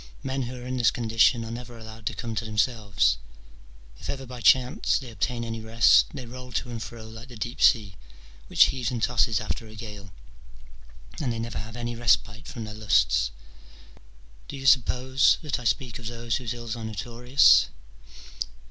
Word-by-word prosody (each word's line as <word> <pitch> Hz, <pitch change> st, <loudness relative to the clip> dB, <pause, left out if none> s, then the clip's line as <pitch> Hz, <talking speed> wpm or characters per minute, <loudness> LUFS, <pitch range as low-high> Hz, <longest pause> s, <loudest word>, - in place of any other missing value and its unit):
Men 135 Hz, 0 st, -2 dB
who 125 Hz, 0 st, -4 dB
are 125 Hz, 0 st, -9 dB
in 130 Hz, 0 st, -3 dB
this 115 Hz, -4 st, +4 dB
condition 115 Hz, 0 st, +2 dB
are 115 Hz, -, -7 dB
never 120 Hz, 0 st, -8 dB
allowed 110 Hz, -1 st, -9 dB
to -, -, -2 dB
come 115 Hz, -1 st, -5 dB
to 110 Hz, -, -2 dB
themselves: 105 Hz, -, +1 dB, 0.8 s
if -, -, -8 dB
ever 135 Hz, -1 st, -4 dB
by 125 Hz, -1 st, -9 dB
chance 125 Hz, +5 st, +4 dB
they 125 Hz, -3 st, -7 dB
obtain 115 Hz, +3 st, -2 dB
any 115 Hz, -1 st, -5 dB
rest, 110 Hz, -, +5 dB
they 130 Hz, -, -7 dB
roll 125 Hz, +1 st, -9 dB
to 120 Hz, +1 st, -2 dB
and 115 Hz, -1 st, -5 dB
fro 115 Hz, -1 st, -8 dB
like 110 Hz, +3 st, -10 dB
the 125 Hz, -, -12 dB
deep 120 Hz, +2 st, -5 dB
sea, 105 Hz, -6 st, +4 dB, 0.5 s
which -, -, +6 dB
heaves 125 Hz, -3 st, -2 dB
and 120 Hz, -3 st, -3 dB
tosses 115 Hz, -3 st, +2 dB
after 110 Hz, +1 st, -4 dB
a 110 Hz, -, -13 dB
gale, 105 Hz, -3 st, -9 dB, 1.1 s
and 130 Hz, -5 st, 0 dB
they 115 Hz, -, -3 dB
never 115 Hz, -2 st, -4 dB
have 110 Hz, +3 st, -8 dB
any 120 Hz, 0 st, -4 dB
respite 115 Hz, +2 st, +1 dB
from 130 Hz, -7 st, -6 dB
their 105 Hz, -1 st, -7 dB
lusts. -, -, +2 dB, 1.2 s
Do -, -, -7 dB
you 135 Hz, -, -8 dB
suppose 130 Hz, +1 st, +4 dB
that 150 Hz, -4 st, -2 dB
I 125 Hz, -, -10 dB
speak 125 Hz, 0 st, -1 dB
of 115 Hz, -, -7 dB
those 115 Hz, -1 st, -2 dB
whose 120 Hz, -2 st, -4 dB
ills 120 Hz, -1 st, -5 dB
are 115 Hz, -, -7 dB
notorious 120 Hz, +5 st, +4 dB
115 Hz, 185 wpm, -26 LUFS, 110-125 Hz, 1.2 s, which